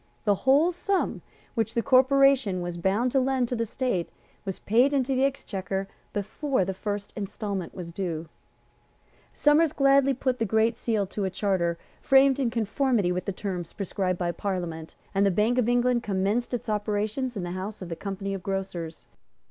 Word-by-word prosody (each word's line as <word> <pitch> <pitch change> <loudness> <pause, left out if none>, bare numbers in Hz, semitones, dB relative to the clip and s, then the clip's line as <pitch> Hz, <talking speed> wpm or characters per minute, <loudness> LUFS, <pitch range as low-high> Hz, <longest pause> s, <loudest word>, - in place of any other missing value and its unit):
The 205 - +4
whole 275 - +4
sum 375 +2 -1 0.3
which 225 -3 -1
the 235 - +1
Corporation 265 -6 +4
was 175 0 -4
bound 195 +8 +1
to 270 - +3
lend 260 -1 +1
to 250 - -1
the 230 -1 -1
State 235 -7 -1 0.4
was 190 -1 -3
paid 250 +7 +3
into 270 0 +1
the 260 +1 +2
Exchequer 195 -8 -2 0.2
before 210 +3 -1
the 190 - -2
first 205 +1 -4
instalment 200 -3 -4
was 175 -3 -6
due. 170 -3 -3 1.0
Somers 300 +1 +4
gladly 275 -1 +4
put 255 0 -1
the - - +1
Great 220 +2 +2
Seal 225 -4 0
to 195 +1 -3
a - - 0
charter 185 -3 0 0.2
framed 270 0 +5
in 260 -4 +2
conformity 230 -3 +1
with 180 0 -2
the 200 - -1
terms 180 -3 -5
prescribed 190 -2 -2
by 175 -1 -1
Parliament; 170 -3 -4 0.2
and 195 0 +3
the 200 - +4
Bank 215 +7 +2
of 240 -1 +2
England 245 0 +2
commenced 205 +3 0
its 245 - -3
operations 215 +3 -1
in 190 - -3
the 175 - -4
house 190 +2 -5
of 175 - -8
the 165 - -3
Company 195 +1 -4
of 195 - -4
Grocers. 185 -4 -4
210 Hz, 180 wpm, -27 LUFS, 190-255 Hz, 1.0 s, framed